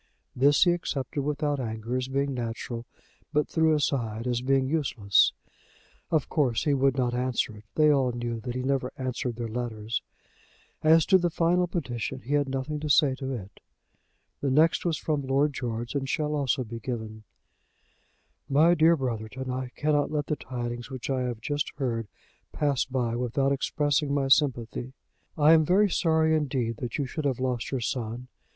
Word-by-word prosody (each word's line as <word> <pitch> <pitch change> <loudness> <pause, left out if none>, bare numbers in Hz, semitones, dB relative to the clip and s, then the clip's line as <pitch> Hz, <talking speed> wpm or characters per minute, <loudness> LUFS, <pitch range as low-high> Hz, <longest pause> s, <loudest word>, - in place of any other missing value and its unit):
This 140 +3 +5
he 175 - +4
accepted 145 -5 -2
without 145 0 -1
anger 115 0 -3
as 130 0 -1
being 140 +1 -1
natural, 120 0 -5 0.4
but 150 0 +1
threw 160 -1 +3
aside 120 -6 -1
as 120 -1 0
being 135 0 +2
useless. 130 -10 +3 0.8
Of 155 -4 +1
course 130 -8 +1
he 145 - +2
would 135 -1 +2
not 125 -2 +1
answer 125 -3 -1
it. 105 - -15
They 155 -1 +5
all 135 -3 +2
knew 120 -1 -3
that 120 +3 -5
he 130 - -2
never 130 -1 0
answered 130 -2 -3
their 120 0 -4
letters. 115 -1 -3 0.8
As 160 0 +5
to 190 - +5
the 175 -1 +1
final 175 +2 +2
petition 125 - -4
he 135 - -4
had 145 -2 +2
nothing 135 +3 -3
to 155 0 -4
say 145 -1 +5
to 135 -1 -3
it. 100 -6 -8 0.8
The 140 - -1
next 155 +7 +3
was 165 -3 +1
from 150 -2 -1
Lord 140 +2 +1
George, 120 -2 -4
and 135 -2 -2
shall 150 +1 0
also 135 -3 0
be 115 0 -7
given: 110 -2 -5 1.3
"MY 155 +5 +5
DEAR 165 0 +5
BROTHERTON, 130 0 -4
I 130 0 -3
cannot 145 -1 +1
let 150 -1 -1
the 150 - -1
tidings 120 -2 -5
which 130 0 -5
I 130 -1 0
have 120 -3 -3
just 145 +3 -2
heard 115 -5 -2 0.4
pass 145 -4 0
by 125 -3 -1
without 125 +3 0
expressing 145 +1 0
my 135 -1 0
sympathy. 130 -3 +1 0.4
I 155 +1 +6
am 160 -1 +6
very 190 +5 +3
sorry 160 -2 +2
indeed 130 -6 -1
that 120 -1 -4
you 145 - -1
should 150 +4 -5
have 130 -3 0
lost 125 -2 -1
your 135 -3 -2
son. 120 +1 -3
135 Hz, 175 wpm, -27 LUFS, 120-150 Hz, 1.3 s, I